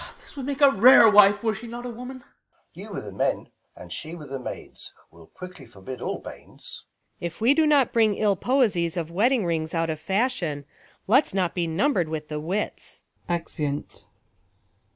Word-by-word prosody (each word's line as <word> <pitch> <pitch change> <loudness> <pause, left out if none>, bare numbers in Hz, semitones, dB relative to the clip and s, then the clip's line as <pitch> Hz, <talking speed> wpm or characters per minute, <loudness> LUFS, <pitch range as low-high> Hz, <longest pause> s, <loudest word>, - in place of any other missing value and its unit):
Ben. - - -11
This - - -16
would 275 -2 -6
make 285 0 -4
a 280 -1 +7
rare 240 +1 +8
wife, 205 0 +6
were 220 -1 +1
she 220 +3 -8
not 240 +1 -7
A - - -4
Avoman. 250 +2 -8
Balt. - - -25 0.5
You - - -10
with - - -5
the - - -8
men, - - -1 0.3
and - - -10
she 160 +2 -7
with 150 -5 -11
the 135 - -4
maids, 125 - -8 0.2
will 80 -1 -17
Quickly 180 -7 -11
forbid 115 +3 -10
all - - -3
banes. - - -11 0.4
Luc. 170 - -1
If - - -18
we 235 +5 +4
do 315 0 +3
not 285 -4 +3
Bring 220 -3 +3
ill 205 -1 +2
poesie 215 -7 +1
■■ 165 - -8
of 165 -1 -3
wedding 225 +4 +2
rings 165 -1 -2
out 165 -1 0
of 155 - -5
Fashion, 190 - -1 0.4
let's 240 0 +3
not 180 -3 0
be 175 -2 -1
numbred 180 - +1
with 155 -1 -5
the 150 -1 -3
wits. 185 +7 -4 0.3
lEzeunt. 150 -4 -4
190 Hz, 200 wpm, -25 LUFS, 160-240 Hz, 0.5 s, rare